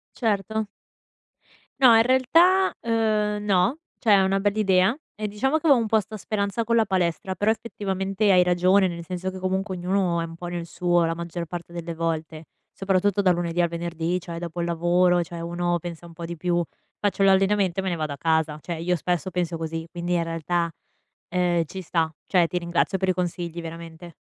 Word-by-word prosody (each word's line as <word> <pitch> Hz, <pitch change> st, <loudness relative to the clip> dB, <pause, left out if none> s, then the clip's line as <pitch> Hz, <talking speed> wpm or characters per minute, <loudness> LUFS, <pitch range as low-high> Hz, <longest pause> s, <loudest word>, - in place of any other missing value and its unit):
Certo. 220 Hz, -1 st, -1 dB, 1.2 s
No, 240 Hz, -3 st, +8 dB
in 225 Hz, -, +6 dB
realtà, 330 Hz, +10 st, +4 dB
uhm, 215 Hz, -2 st, 0 dB
no, 200 Hz, -, +2 dB, 0.2 s
cioè 225 Hz, -, 0 dB
è 200 Hz, -, +7 dB
una 190 Hz, +1 st, +2 dB
bella 205 Hz, +1 st, 0 dB
idea 190 Hz, 0 st, +3 dB, 0.2 s
e 215 Hz, -, -3 dB
diciamo 265 Hz, +9 st, 0 dB
che 315 Hz, -, -2 dB
avevo 280 Hz, -5 st, +6 dB
un 230 Hz, -, 0 dB
po' 220 Hz, +1 st, +3 dB
'sta 215 Hz, +1 st, -6 dB
speranza 200 Hz, +2 st, -2 dB
con 230 Hz, +1 st, +1 dB
la 225 Hz, -, +4 dB
palestra, 185 Hz, -2 st, -1 dB
però 205 Hz, +4 st, +1 dB
effettivamente 200 Hz, -2 st, -1 dB
hai 180 Hz, -2 st, +6 dB
ragione, 180 Hz, +2 st, +3 dB
nel 170 Hz, -2 st, -4 dB
senso 180 Hz, +2 st, -4 dB
che, 190 Hz, -, -8 dB
comunque, 190 Hz, +1 st, -2 dB
ognuno 180 Hz, -1 st, 0 dB
è -, -, -2 dB
un 165 Hz, -, -10 dB
po' 175 Hz, +1 st, -7 dB
nel 175 Hz, -1 st, -4 dB
suo, 175 Hz, 0 st, +1 dB
la 165 Hz, -, -1 dB
maggior 170 Hz, 0 st, -5 dB
parte 170 Hz, +1 st, -7 dB
delle 170 Hz, -1 st, -5 dB
volte; 160 Hz, -1 st, -3 dB, 0.3 s
soprattutto 195 Hz, +1 st, +1 dB
dal 185 Hz, -2 st, +4 dB
lunedì 175 Hz, 0 st, -1 dB
al 170 Hz, -, +2 dB
venerdì, 170 Hz, +1 st, -2 dB
cioè 170 Hz, -1 st, -7 dB
dopo 175 Hz, 0 st, -5 dB
il 170 Hz, -, -1 dB
lavoro, 175 Hz, +1 st, +2 dB
cioè 170 Hz, 0 st, -7 dB
uno 175 Hz, +1 st, -1 dB
pensa 170 Hz, 0 st, -8 dB
un 170 Hz, -, -11 dB
po' 165 Hz, 0 st, -7 dB
di 170 Hz, +1 st, -6 dB
più: 175 Hz, +1 st, 0 dB, 0.4 s
"Faccio 205 Hz, -1 st, 0 dB
l'allenamento 195 Hz, -1 st, +3 dB
e -, -, -5 dB
me 190 Hz, -, -2 dB
ne 175 Hz, -, -1 dB
vado 155 Hz, -2 st, -3 dB
a 140 Hz, -, -7 dB
casa". 160 Hz, -2 st, +1 dB
Cioè 170 Hz, -, -5 dB
io 175 Hz, +2 st, 0 dB
spesso 175 Hz, +1 st, -1 dB
penso 175 Hz, -2 st, -2 dB
così, 165 Hz, 0 st, -4 dB
quindi 175 Hz, 0 st, -4 dB
in 170 Hz, -, +1 dB
realtà, 165 Hz, +1 st, -1 dB, 0.6 s
ehm, 175 Hz, -2 st, +1 dB
ci 190 Hz, +5 st, -7 dB
sta, 165 Hz, -2 st, 0 dB
cioè 180 Hz, -3 st, +3 dB
ti 180 Hz, +2 st, -2 dB
ringrazio 170 Hz, +2 st, 0 dB
per 190 Hz, 0 st, -1 dB
i 185 Hz, -, +3 dB
consigli, 175 Hz, -1 st, -3 dB
veramente. 165 Hz, +1 st, -9 dB
180 Hz, 205 wpm, -24 LUFS, 170-200 Hz, 1.2 s, No